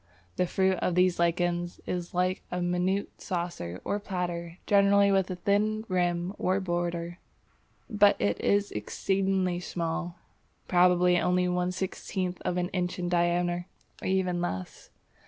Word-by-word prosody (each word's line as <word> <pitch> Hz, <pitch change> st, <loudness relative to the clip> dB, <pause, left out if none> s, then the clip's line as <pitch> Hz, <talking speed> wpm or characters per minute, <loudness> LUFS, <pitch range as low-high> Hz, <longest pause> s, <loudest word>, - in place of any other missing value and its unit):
The 180 Hz, -, +1 dB
fruit 190 Hz, +1 st, +2 dB
of 180 Hz, -, 0 dB
these 180 Hz, -1 st, +3 dB
lichens 175 Hz, 0 st, 0 dB
is 175 Hz, -1 st, -3 dB
like 180 Hz, +1 st, 0 dB
a 180 Hz, -, -3 dB
minute 180 Hz, +3 st, -1 dB
saucer 170 Hz, -, -4 dB
or 205 Hz, -, -1 dB
platter 175 Hz, -4 st, -4 dB
generally 200 Hz, 0 st, +5 dB
with 195 Hz, -1 st, +2 dB
a 185 Hz, -, -3 dB
thin 210 Hz, +4 st, 0 dB
rim 175 Hz, 0 st, 0 dB
or 185 Hz, +2 st, +1 dB
border, 175 Hz, -1 st, -2 dB, 0.7 s
but 205 Hz, -3 st, +4 dB
it 100 Hz, 0 st, 0 dB
is 205 Hz, 0 st, +2 dB
exceedingly 190 Hz, -, 0 dB
small, 170 Hz, 0 st, -3 dB, 0.5 s
probably 180 Hz, 0 st, +4 dB
only 180 Hz, 0 st, +2 dB
one 180 Hz, 0 st, 0 dB
sixteenth 185 Hz, -1 st, -3 dB
of 180 Hz, -, -1 dB
an 180 Hz, 0 st, 0 dB
inch 180 Hz, 0 st, -2 dB
in 175 Hz, -1 st, -2 dB
diameter, 175 Hz, 0 st, +1 dB, 0.3 s
or -, -, -3 dB
even 185 Hz, -2 st, +1 dB
less. 95 Hz, -, -5 dB
180 Hz, 140 wpm, -28 LUFS, 175-190 Hz, 0.7 s, generally